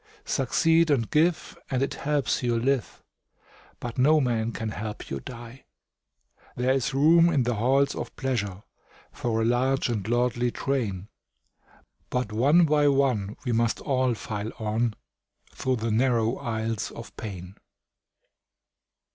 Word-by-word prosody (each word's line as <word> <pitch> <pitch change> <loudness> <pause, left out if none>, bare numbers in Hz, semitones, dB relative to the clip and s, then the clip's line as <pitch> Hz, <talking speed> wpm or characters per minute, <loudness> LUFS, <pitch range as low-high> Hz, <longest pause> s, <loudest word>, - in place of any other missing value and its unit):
Succeed 160 +5 +2
and 125 -6 +1
give, 165 +2 +1
and 130 -1 0
it 140 - -2
helps 145 -4 -1
you 120 -2 +1
live, 130 +1 -1 0.8
But 120 +1 -6
no 155 +4 +5
man 115 -4 0
can 110 -1 -4
help 105 0 -6
you 70 - -2
die. 120 - -10 0.9
There 125 +2 +1
is 135 0 -1
room 165 +4 +5
in 145 -6 +2
the 120 +1 0
halls 130 +6 +2
of - - -6
pleasure 105 -7 -3 0.5
For 115 -2 -1
a - - +1
large 130 +3 +1
and 105 -4 -2
lordly 120 +1 +1
train, 110 -8 -2 1.0
But 125 -4 -2
one 145 +10 +4
by 150 -1 +3
one 130 -8 +1
we 125 - 0
must 115 0 +1
all 130 -4 0
file 105 0 -5
on 110 +1 -1 0.6
Through 130 -1 -1
the 115 -1 -2
narrow 115 0 +2
aisles 110 -1 -3
of 115 - -11
pain. 95 -4 -7
120 Hz, 140 wpm, -26 LUFS, 110-135 Hz, 1.0 s, no